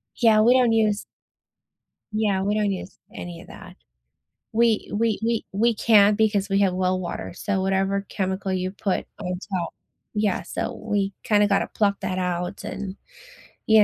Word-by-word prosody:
Yeah, 220 -3 +5
we 240 +3 +6
don't 245 -3 +4
use 215 -2 +2 1.1
Yeah, 210 -3 +1
we 205 +2 0
don't 210 -2 +1
use 185 0 -6 0.2
any 175 -1 -7
of - - -15
that. - - -12 0.8
We 225 -1 +2
we 225 0 +1
we 230 -1 0
we 230 +4 +2
can't 210 -1 +5
because 210 -3 +2
we 195 0 +1
have 190 -2 +3
well 185 0 +1
water, 175 -1 -5
so 195 0 -1
whatever 195 +1 0
chemical 190 0 -2
you 185 0 -1
put 195 -1 -2
on 180 -3 -3
top 180 -2 -1 0.5
yeah, 205 -5 +1
so - - -4
we 205 -2 -1
kinda 210 -1 +4
gotta 200 -1 +2
pluck 200 -2 0
that 190 -2 -3
out 180 -1 -2
and 195 -1 -5 0.7
you 220 -1 +7
200 Hz, 165 wpm, -24 LUFS, 190-215 Hz, 1.1 s, you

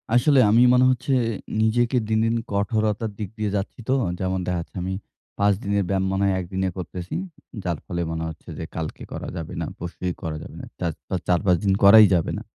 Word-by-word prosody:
আসলে 135 +3 +5
আমি 115 +3 +6
মনে 125 0 +5
হচ্ছে 130 +2 -1 0.5
নিজেকে 120 +3 +2
দিন, 110 0 +2
দিন 115 +1 +1 0.2
কঠোরতার 110 +1 0
দিক 100 -3 -3
দিয়ে 105 -2 -1
যাচ্ছি 100 +4 -3
তো। 130 - +4 0.3
যেমন 95 0 -1
দেখাচ্ছে 85 -2 -3
আমি 95 +1 -2 0.5
৫ 100 0 +4
দিনের 100 0 +1
ব্যায়াম 95 -1 +1
মনে 95 +1 0
হয় 95 -1 +2
১ 90 - -4
দিনে 95 0 0
করতেছি 90 0 -6 0.5
যার 85 -3 -1
ফলে 85 -1 -3
মনে 80 0 -3
হচ্ছে 80 +2 -11
যে 80 - -4
কালকে 80 -1 -5
করা - - -5
যাবে 80 - -6
না, - - -1
পরশুই 90 +1 -4
করা 80 -1 -3
যাবে - - -11
না - - -8
চাজ 85 -3 -1 0.3
৪-৫ 90 0 +3
দিন 100 -2 +3
করাই 105 +2 +10
যাবে 85 -3 +1
না। - - -6
95 Hz, 200 wpm, -24 LUFS, 90-110 Hz, 0.5 s, করাই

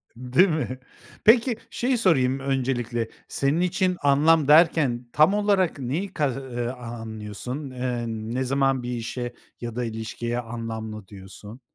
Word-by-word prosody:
Değil 130 +10 +3
mi? 145 -5 -2 0.5
Peki 230 +1 +5
şeyi 250 0 0
sorayım 135 - +3
öncelikle. 125 -4 -1 0.2
Senin 140 +5 +1
için 180 0 +1
anlam 145 +2 +4
derken 150 -6 +4
tam 155 +6 +5
olarak 200 -6 +2
neyi 155 +10 -3
kas 140 -4 0
eee, 120 -3 -4
a 125 - -4 0.3
anlıyorsun? 110 +6 -6
Eee, 125 -2 -3
ne 115 +3 -3
zaman 135 -1 +1
bir 120 - -4
işe 120 +1 -4 0.3
ya 120 -2 -5
da 125 - -1
ilişkiye 115 +2 -4
anlamlı 110 -3 -6
diyorsun? 100 +4 -11
130 Hz, 140 wpm, -25 LUFS, 120-155 Hz, 0.5 s, Peki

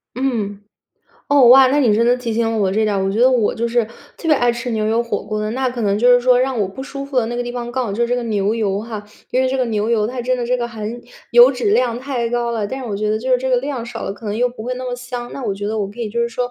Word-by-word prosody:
嗯。 225 -6 -2 0.7
哦， 280 -4 +6
哇， 260 +1 +8
那 285 - +2
你 245 -7 +4
真 230 +2 +2
的 240 +1 +4
提 235 -3 -3
醒 225 -1 0
我 195 -2 +2
这 215 +3 +1
点 210 -1 0
儿， 195 - 0
我 195 - 0
觉 205 - -2
得 255 +2 +5
我 240 -5 +2
就 235 - -1
是 235 +1 +2 0.3
特 330 - -5
别 310 - +6
爱 245 -3 +2
吃 235 +1 -5
牛 215 -2 -1
油 225 +2 +1
火 235 - -3
锅 215 0 -4
的。 215 0 -2
那 260 +1 -1
可 245 -1 -5
能 205 -2 +1
就 245 +3 +4
是 245 - +5
说 250 0 +4
让 255 -2 0
我 195 - 0
不 230 +7 -8
舒 275 0 -6
服 275 -1 -7
的 235 - +2
那 240 - -4
个 245 - -1
地 245 - -5
方 240 -1 -5
刚 260 0 -1
好 200 - -3
就 225 +4 -1
是 235 - +1
这 245 - +1
个 245 - -2
牛 210 -1 0
油 205 -4 0
哈， 220 -1 -6 0.3
因 255 - +1
为 260 - +2
这 265 - -1
个 255 - +1
牛 215 -1 -1
油 220 -2 +2
它 250 +1 -4
真 255 +1 0
的 245 - -3
这 245 +1 0
个 240 0 -2
含 220 -2 -6 0.4
油 240 +2 +8
脂 245 -6 -1
量 235 +2 +2
太 250 -3 -2
高 240 0 -1
了， 225 -3 -2
但 260 +6 -5
是 265 - -6
我 210 - -3
觉 210 +1 -1
得 215 +1 +1
就 255 +3 -4
是 255 - +4
这 260 +1 -3
个 255 - +3
量 260 -2 -3
少 240 -1 -7
了， - - -3
可 220 - -11
能 205 0 -2
又 245 +2 +1
不 240 -3 -9
会 250 +2 -3
那 255 +1 -6
么 250 -1 -3
香。 245 -1 -7
那 275 - -6
我 210 -5 -2
觉 205 +1 -5
得 220 +1 -2
我 200 -2 -1
可 205 +4 -14
以 225 -3 -3
就 235 +3 -2
是 235 - +1
说， 245 +1 -3
235 Hz, 365 characters per minute, -19 LUFS, 215-250 Hz, 0.7 s, 哇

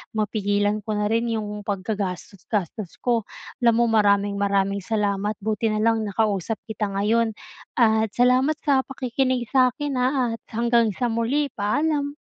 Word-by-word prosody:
mapigilan 205 -1 0
ko 215 - -2
na 210 0 0
rin 230 +1 +1
'yong 210 -2 -4
paggagastos-gastos 195 -1 -4
ko. 235 -4 +1 0.3
Alam 235 -3 +4
mo, - - +4
maraming-maraming 200 -1 +2
salamat. 205 -1 0
Buti 220 +1 0
na 215 - 0
lang 225 -1 +2
nakausap 210 0 -1
kita 215 -1 -2
ngayon. 220 +3 +1 0.4
At 220 -2 +3
salamat 255 +5 +3
sa 270 -3 +2
pakikinig 255 -2 -1
sa 260 -2 +5
akin, 290 -1 -3
ha, 250 - +3 0.3
at - - -49
hanggang 235 -2 +2
sa 245 -2 -1
muli. 255 +6 0
Paalam. 285 +7 0
220 Hz, 140 wpm, -23 LUFS, 205-240 Hz, 0.4 s, sa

